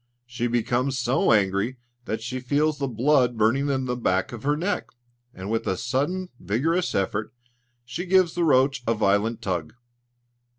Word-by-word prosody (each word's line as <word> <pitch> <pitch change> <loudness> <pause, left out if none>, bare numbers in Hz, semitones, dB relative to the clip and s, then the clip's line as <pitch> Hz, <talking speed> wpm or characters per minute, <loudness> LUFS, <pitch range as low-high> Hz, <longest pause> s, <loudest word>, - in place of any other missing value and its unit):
She 120 0 -2
becomes 120 +3 0
so 120 0 +2
angry 105 +4 +2 0.3
that 110 0 -3
she 130 +2 -4
feels 145 +4 0
the 140 - -1
blood 125 0 +2
burning 125 +7 +2
in 130 -2 0
the 125 -1 -1
back 95 -6 0
of 120 -3 -7
her 145 +3 +1
neck, 190 +6 -1 0.4
and 95 -1 -7
with 115 - -1
a 95 - 0
sudden 145 - -1
vigorous 155 - 0
effort, 100 +3 -1 0.5
she 165 +10 -5
gives 185 -2 +4
the 175 - 0
roach 135 -4 +3
a 115 - +2
violent 105 +2 +1
tug. 90 -3 -3
125 Hz, 165 wpm, -25 LUFS, 110-140 Hz, 0.5 s, gives